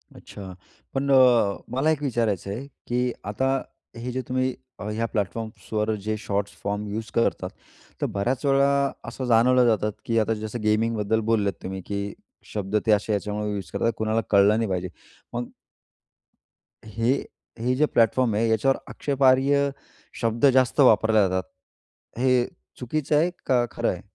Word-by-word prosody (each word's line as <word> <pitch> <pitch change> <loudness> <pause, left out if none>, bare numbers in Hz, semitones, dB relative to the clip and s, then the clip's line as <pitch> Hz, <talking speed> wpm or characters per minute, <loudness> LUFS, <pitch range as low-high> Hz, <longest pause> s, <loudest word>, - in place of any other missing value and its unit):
अच्छा, 95 -2 -10 0.4
पण 140 +1 0
अ, 125 -6 +5 0.2
मला 150 +4 +2
एक 150 - -1
विचारायचं 115 -8 -1
आहे, 130 +7 -5 0.2
की 125 0 0
आता 130 +6 0 0.4
हे 120 +2 -5
जे 130 - -2
तुम्ही 130 0 0 0.3
अ, - - -6
ह्या 110 +2 -1
प्लॅटफॉर्म्सवर 110 0 -2
जे 110 - 0
शॉर्ट 100 -1 -2 0.2
फॉर्म 105 +1 -2
यूज 110 +1 -4
करतात, 115 - +1 0.5
तर - - +2
बऱ्याच 125 +7 -1
वेळा 140 0 +3 0.2
असं 130 - -5
जाणवलं 125 +1 +4
जातं, 110 -2 +2 0.2
की 115 -1 +1
आता 110 +1 +1
जसं 110 +1 -5
गेमिंगबद्दल 110 0 +1
बोललेत 100 -3 +2
तुम्ही, 95 0 -5
की 100 0 -3 0.4
शब्द 105 -1 -3
ते 110 - +3
असे 105 +1 +2
ह्याच्यामुळं 105 +1 -2
यूज 100 -3 -5
करतात, 115 - +1
कुणाला 110 +1 0
कळलं 100 +1 +5
नाही 115 -2 -1
पाहिजे, 90 -1 -2 0.4
मग 120 0 -4 1.3
हे, 115 +3 0 0.5
हे 125 +3 0
जे 150 +3 +3
प्लॅटफॉर्म 115 -1 +2
आहे, 115 +2 +2
याच्यावर 110 +5 +2
आक्षेपार्ह 140 +1 +2 0.5
शब्द 115 +2 +1
जास्त 130 +2 +2
वापरले 110 -4 +5
जातात, 95 0 -1 0.8
हे 125 -1 +3 0.3
चुकीचं 150 +4 -1
आहे 170 +4 +3 0.2
का 125 -2 +3
खरं - - -1
आहे? - - -3
115 Hz, 150 wpm, -25 LUFS, 105-130 Hz, 1.3 s, अ